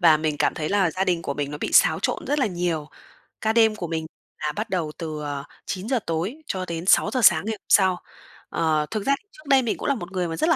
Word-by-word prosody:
Và 165 -4 +6
mình 155 -1 -1
cảm - - +2
thấy 155 -3 -3
là 195 -4 +2
gia 190 +4 -1
đình 175 -3 0
của 140 - -3
mình 145 -1 -3
nó 150 - -6
bị - - -3
xáo - - +6
trộn - - -1
rất 295 +1 +1
là 260 - +2
nhiều. 175 -5 -2 0.5
Ca 220 0 +1
đêm 225 -2 +4
của 175 -5 -5
mình 160 -1 -3 0.4
là 150 - +1
bắt 215 - -3
đầu 165 -5 -1
từ, 155 -3 -5
ờ, 145 -1 -4 0.2
9:00 225 +7 -1
tối 170 - -2
cho 185 -1 -2
đến 170 0 -5
6:00 220 +6 +4
sáng 170 +2 +6
ngày 220 - -1
hôm - - -70
sau. 190 -2 +5 0.5
Ờ, 155 -2 +1
thực 215 -2 -3
ra 275 0 +3
thì - - -47
trước 305 -1 -17
đây 270 -1 +5
mình 235 -3 -1
cũng - - -4
là 280 - +2
một 175 -4 -7
người 180 -2 -1
mà 165 - -4
rất 325 - +1
là - - +5
180 Hz, 275 wpm, -24 LUFS, 160-215 Hz, 0.5 s, Và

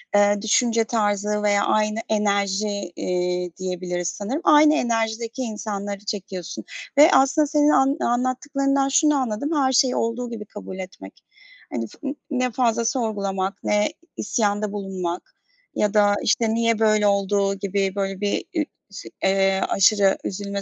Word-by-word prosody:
eee, 205 0 +4
düşünce 230 +1 +2
tarzı 210 -2 -1
veya 205 -1 +2
aynı 215 0 +1
enerji, 200 -1 +1 0.3
eee, 180 0 -1
diyebiliriz 180 -1 -3
sanırım. 230 - -3
Aynı 300 -2 +6
enerjideki 230 -1 -1
insanları 205 -3 -5
çekiyorsun 190 -4 -5 0.3
ve 300 +4 +8
aslında 275 +3 +4
senin 295 0 +3
an 270 0 +3
anlattıklarından 270 +3 0
şunu 300 +2 +3
anladım, 260 +2 -2
her 270 -3 +2
şeyi 255 0 +3
olduğu 235 +2 -2
gibi 225 -3 -7
kabul 195 -2 -9
etmek. 185 - -10 0.5
Hani, 115 -1 -3
fı - - -17
n 275 - -3 0.2
ne 255 -2 0
fazla 235 -1 +1
sorgulamak, 200 -5 -1
ne 210 0 +2
i - - -15 0.2
isyanda 210 -2 -1
bulunmak 190 -4 -5 0.4
ya 210 0 0
da 205 -1 +4
işte, 220 +1 +1
niye 230 -1 +1
böyle 215 -1 +3
olduğu 200 0 +1
gibi 195 0 -2
böyle 195 -1 -3
bir 205 -1 -1
ü 315 -2 +1 0.3
şi 200 - -9
eee, 195 0 +2
aşırı 195 0 +4
üzülme 200 +1 -4
210 Hz, 145 wpm, -23 LUFS, 195-240 Hz, 0.5 s, ve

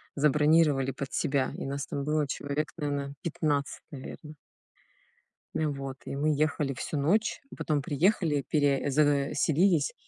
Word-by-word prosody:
забронировали 150 -1 +3
под 135 0 -6
себя, 135 -1 +1
и - - -5
нас 140 0 -3
там 140 - -3
было 150 -1 +1
человек, 145 +2 -3
наверно, 140 -2 -2
15, 145 -3 -1
наверно. 150 +2 -9 1.2
Э, 155 - +1
вот 135 -2 -5
и 140 - -4
мы 150 +1 +2
ехали 150 -2 0
всю 150 - -4
ночь, 205 +10 +1
и - - -9
потом 150 -2 0
приехали, 150 - +1
пере 145 -3 +2
э, - - +1
заселились, 145 +3 +2
145 Hz, 145 wpm, -29 LUFS, 140-155 Hz, 1.2 s, забронировали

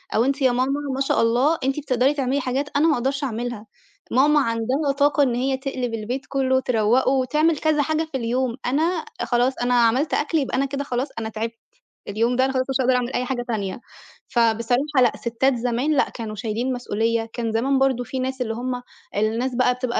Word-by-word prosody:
أو 225 - +3
أنتِ 275 +1 -1
يا 260 -2 +4
ماما 260 +3 0 0.2
ما - - -4
شاء 270 - +2
الله 250 +8 +3
أنتِ 270 +3 0
بتقدري 265 -1 +1
تعملي 275 -1 0
حاجات 265 +3 -2
أنا 295 +3 +4
ما 320 - +4
أقدرش 270 +2 -1
أعملها." 240 -3 -4 0.4
ماما 295 +4 +4
عندها 255 +4 0
طاقة 290 +1 +3
إن 250 -3 +1
هي 265 +2 0
تقلب 260 -3 -3
البيت 230 +4 -4
كلّه 265 -1 +1
وتروّقه 245 -1 +2
وتعمل 300 +5 +2
كذا 305 0 +2
حاجة 315 +2 0
في 270 - -1
اليوم، 245 0 -1
أنا 275 +5 +1 0.4
آآ - - 0
خلاص 245 +2 +2
أنا 245 0 0
عملت 245 +5 +3
أكل 310 +2 +1
يبقى 270 -3 -1
أنا 275 - +2
كده 280 +1 -3
خلاص 255 0 -2
أنا 220 -1 -4
تعبت 225 +1 -4 0.5
اليوم 230 +4 0
ده 260 +1 +3
أنا 265 - -1
خلاص 260 -1 +1
مش 270 - -1
هاقدر 255 0 +3
أعمل 250 +1 -1
أي 250 - 0
حاجة 250 -1 -2
تانية. 210 -2 -3 0.5
فبصراحة 245 +4 +1
لأ، 245 -3 +5
سِتّات 245 +3 0
زمان 245 +4 0
لأ، - - +3
كانوا 220 -2 -6
شايلين 225 +4 -2
مسؤولية، 230 -1 -1
كان 230 -2 -2
زمان 265 +5 +1
برضه 265 -2 +2
في 260 +2 -5
ناس 260 0 -3
اللي 225 -2 -1
هم 250 +2 -3 0.3
الناس 225 +5 0
بقى 250 0 +3
بتبقى 250 -1 -2
255 Hz, 205 wpm, -23 LUFS, 235-270 Hz, 0.5 s, لأ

